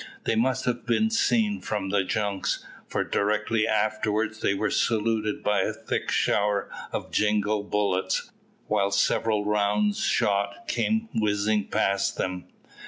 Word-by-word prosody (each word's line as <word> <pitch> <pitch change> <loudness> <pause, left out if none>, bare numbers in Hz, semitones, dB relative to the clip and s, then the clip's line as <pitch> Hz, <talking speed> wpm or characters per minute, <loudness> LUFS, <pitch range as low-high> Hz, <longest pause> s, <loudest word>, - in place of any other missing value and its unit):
They - - +1
must 120 +4 +1
have 120 -1 -1
been 220 - +2
seen 225 -2 +2
from 100 -3 -3
the 100 0 +2
junks, 100 0 -2 0.2
for - - -1
directly 110 +2 0
afterwards 110 +1 0
they 100 - +2
were 105 +2 -1
saluted 110 -2 0
by 105 0 +2
a - - 0
thick - - -3
shower 105 -1 +1 0.2
of - - -4
jingall 105 0 +1
bullets, 100 -2 -1 0.3
while 100 0 +1
several 105 +1 +1
round 105 0 +1
shot 100 0 0
came 220 - 0
whizzing 105 -1 +1
past 100 0 0
them. 90 -1 -3
105 Hz, 135 wpm, -26 LUFS, 100-110 Hz, 0.3 s, been